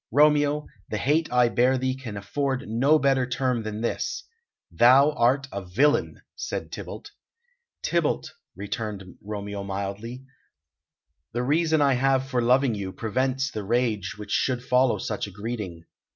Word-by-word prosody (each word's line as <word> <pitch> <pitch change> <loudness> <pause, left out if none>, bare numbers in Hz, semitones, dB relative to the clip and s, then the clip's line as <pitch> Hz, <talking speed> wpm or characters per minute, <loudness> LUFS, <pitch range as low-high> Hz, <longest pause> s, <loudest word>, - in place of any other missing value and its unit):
"Romeo, 150 +2 +3 0.2
the 105 - -2
hate 150 +8 +1
I 125 -1 +4
bear 125 +3 +3
thee 130 0 -1
can 120 -6 -7
afford 130 +6 -2
no 130 +8 +3
better 135 -3 +2
term 125 -1 0
than 110 0 -5
this - - -2 0.5
thou 130 - +6
art 135 +1 +2
a 100 0 -5
villain!" 130 +12 +1
said - - -5
Tybalt. - - -8 0.7
"Tybalt," 170 -3 0 0.2
returned 100 -1 -6
Romeo 100 -1 -5
mildly, 100 +6 -5 1.1
"the 120 +1 -1
reason 155 +2 +2
I 140 -1 +4
have 135 +1 +2
for 125 -2 0
loving 125 +1 +3
you 100 -3 -4
prevents 130 +5 -1
the 105 - -4
rage 110 -3 0
which 105 -1 -8
should 125 -2 0
follow 125 0 +3
such 105 -1 -3
a - - -10
greeting. 100 -5 -6
125 Hz, 145 wpm, -25 LUFS, 105-135 Hz, 1.1 s, thou